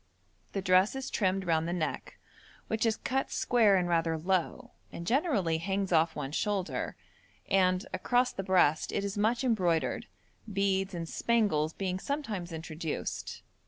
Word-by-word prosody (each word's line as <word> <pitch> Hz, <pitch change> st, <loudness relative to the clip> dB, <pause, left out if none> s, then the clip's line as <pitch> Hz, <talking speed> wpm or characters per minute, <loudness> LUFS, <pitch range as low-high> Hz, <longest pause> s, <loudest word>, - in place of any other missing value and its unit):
The 195 Hz, -, -2 dB
dress 185 Hz, +4 st, +4 dB
is 270 Hz, 0 st, -5 dB
trimmed 190 Hz, -2 st, 0 dB
round 165 Hz, -1 st, +1 dB
the 170 Hz, -, -1 dB
neck, 170 Hz, -3 st, -3 dB, 0.5 s
which 220 Hz, +1 st, 0 dB
is 220 Hz, -, +2 dB
cut 265 Hz, +1 st, -1 dB
square 225 Hz, -5 st, +3 dB
and 180 Hz, -2 st, +1 dB
rather 165 Hz, -1 st, +1 dB
low, 190 Hz, +8 st, -1 dB, 0.2 s
and 170 Hz, -, -7 dB
generally 220 Hz, -, +1 dB
hangs 195 Hz, +2 st, -2 dB
off 160 Hz, -1 st, +3 dB
one 135 Hz, -, -4 dB
shoulder, 200 Hz, +3 st, -2 dB, 0.5 s
and, 185 Hz, -1 st, +2 dB
across 245 Hz, +1 st, +1 dB
the -, -, -3 dB
breast 180 Hz, -5 st, +3 dB
it 200 Hz, -, -1 dB
is 200 Hz, -, -3 dB
much 225 Hz, +5 st, +1 dB
embroidered, 180 Hz, -10 st, +1 dB, 0.4 s
beads 195 Hz, -1 st, 0 dB
and 165 Hz, -1 st, -4 dB
spangles 180 Hz, -9 st, +1 dB
being 185 Hz, -1 st, -2 dB
sometimes 220 Hz, -, -3 dB
introduced. 160 Hz, -1 st, -5 dB
190 Hz, 150 wpm, -30 LUFS, 170-215 Hz, 0.5 s, dress